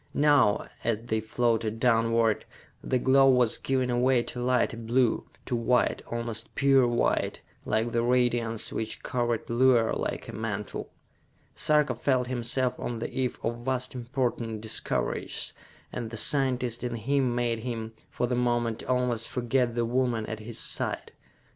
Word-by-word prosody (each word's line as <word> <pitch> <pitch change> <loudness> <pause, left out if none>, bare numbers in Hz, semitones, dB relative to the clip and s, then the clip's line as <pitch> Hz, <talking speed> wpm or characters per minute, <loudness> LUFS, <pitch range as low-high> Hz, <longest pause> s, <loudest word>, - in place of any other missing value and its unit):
Now, 145 -8 +4 0.2
as 115 -2 +1
they 110 -2 -1
floated 115 0 0
downward, 115 -2 +2 0.4
the 130 - +1
glow 135 +2 +5
was 125 -3 +3
giving 130 -2 0
away 125 0 +3
to 125 - -6
lighter 125 -1 +1
blue, 115 +1 +1 0.2
to 125 - -1
white, 120 +1 +2
almost 115 -1 -4
pure 135 -2 +4
white, 120 0 0 0.2
like 110 +2 0
the 115 - +1
radiance 120 -2 +1
which 110 0 -4
covered 120 -2 -1
Luar 120 -1 +3
like - - -3
a - - -7
mantle. 105 -2 -4 0.6
Sarka 150 -4 +3
felt 125 +1 +1
himself 125 +1 -1
on 120 - -3
the 115 - -4
eve 130 -2 -1
of 115 +1 -1
vast 130 +1 -2
important 120 -3 -2
discoveries, 110 0 -2 0.4
and 120 -2 -4
the 115 - -7
scientist 125 -2 +1
in 120 -1 -2
him 125 +2 0
made 120 -2 0
him, 115 -1 -5 0.2
for - - -1
the 125 - -2
moment, 120 -2 0
almost 125 -2 0
forget 125 -1 0
the 120 -1 +1
woman 120 -2 0
at 110 0 -5
his 110 +1 -6
side. - - -2
120 Hz, 150 wpm, -28 LUFS, 115-125 Hz, 0.6 s, glow